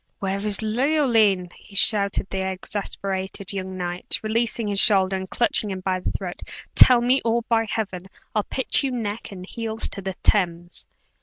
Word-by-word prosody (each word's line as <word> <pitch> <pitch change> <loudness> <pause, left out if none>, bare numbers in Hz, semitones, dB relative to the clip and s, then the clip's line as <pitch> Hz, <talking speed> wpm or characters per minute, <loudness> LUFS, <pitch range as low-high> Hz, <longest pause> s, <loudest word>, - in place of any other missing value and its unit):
"Where 195 -1 -2
is 210 0 +1
Leoline?" 225 - +2 0.2
shouted 200 -1 +2
the 190 - -2
exasperated 190 0 -4
young 190 -1 -5
knight, 175 0 -3
releasing 225 0 0
his 200 -1 +2
shoulder, 195 -3 +4
and 190 0 -5
clutching 225 -1 +1
him 190 -1 -5
by 185 0 -1
the - - -3
throat. 180 -3 -5 0.3
"Tell 250 -2 +7
me 255 +3 +2
or, 235 0 +1
by 225 -1 +1
Heaven! 190 -4 -4 0.3
I'll 215 - +2
pitch 260 +6 0
you 275 - 0
neck 225 -4 -4
and 185 -2 -8
heels 225 +2 -4
into 200 - 0
the 190 -1 -5
Thames!" 175 -4 0
200 Hz, 165 wpm, -23 LUFS, 190-225 Hz, 0.3 s, Tell